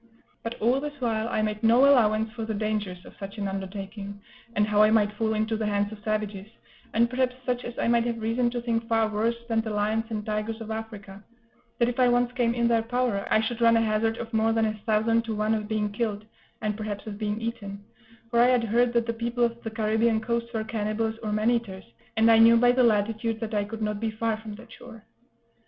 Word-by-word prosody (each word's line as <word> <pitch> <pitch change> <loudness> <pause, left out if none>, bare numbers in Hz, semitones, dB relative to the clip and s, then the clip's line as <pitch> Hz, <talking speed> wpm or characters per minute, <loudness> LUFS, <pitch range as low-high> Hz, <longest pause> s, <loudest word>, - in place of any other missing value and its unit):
But 230 +1 -6
all 245 +5 +2
this 290 0 -6
while 225 -2 -1
I 215 - 0
made 210 0 -2
no 235 +4 +5
allowance 220 -5 +3
for 230 -2 -5
the 220 -1 -3
dangers 205 -4 -3
of - - -13
such 195 +1 -7
an 200 -1 -2
undertaking, 195 +1 -6 0.4
and 210 - +3
how 210 0 +3
I 215 - +6
might 215 -2 +3
fall 220 +1 -1
into 220 +1 0
the 215 -1 -2
hands 205 0 0
of 215 -1 -11
savages, 215 -2 -2 0.4
and 235 +2 +3
perhaps 250 0 0
such 250 -1 -1
as 240 - -7
I - - 0
might 235 0 +3
have 235 -1 -2
reason 230 +2 +1
to 240 0 -4
think 230 -1 -1
far 225 -1 +2
worse 220 +2 0
than 225 -1 +1
the 220 - -5
lions 215 +2 0
and 215 -2 -4
tigers 215 +1 -3
of 225 -1 -7
Africa: 210 -3 -7 0.5
that 235 - +2
if 245 +1 -3
I 250 - +5
once 245 0 +2
came 240 -2 0
in 235 -1 +2
their 230 -1 +3
power, 235 -3 -1
I 215 - +4
should 230 +1 -3
run 230 0 +5
a - - +3
hazard 225 +1 0
of 230 0 -7
more 220 0 +2
than 225 0 +2
a 215 - 0
thousand 225 +1 +2
to 225 -1 -3
one 215 +1 +1
of 215 -1 -2
being 210 -1 -1
killed, 210 -1 -3 0.4
and 210 -1 -1
perhaps 210 -2 -5
of 210 -2 -7
being 210 0 -2
eaten; 210 -3 -5 0.5
for 235 - +2
I 240 - +6
had 250 -2 +3
heard 235 +2 +2
that 235 -1 +2
the 230 - -2
people 235 +1 -1
of 235 0 0
the 225 - -4
Caribbean 220 +1 +1
coast 235 +1 -2
were 220 -2 -2
cannibals 220 +1 -2
or 215 - -3
man 215 +3 +2
eaters, 220 -6 -3 0.3
and 225 +1 +5
I 225 - +6
knew 230 +1 +7
by 245 +1 +5
the 255 +1 +2
latitude 225 0 +1
that 225 -1 -4
I 205 -1 +1
could 220 +1 -6
not 210 -1 -2
be 225 0 -1
far 220 0 -1
from 215 -1 -8
that 230 +1 -14
shore. 230 -3 -13
225 Hz, 240 wpm, -26 LUFS, 215-235 Hz, 0.5 s, knew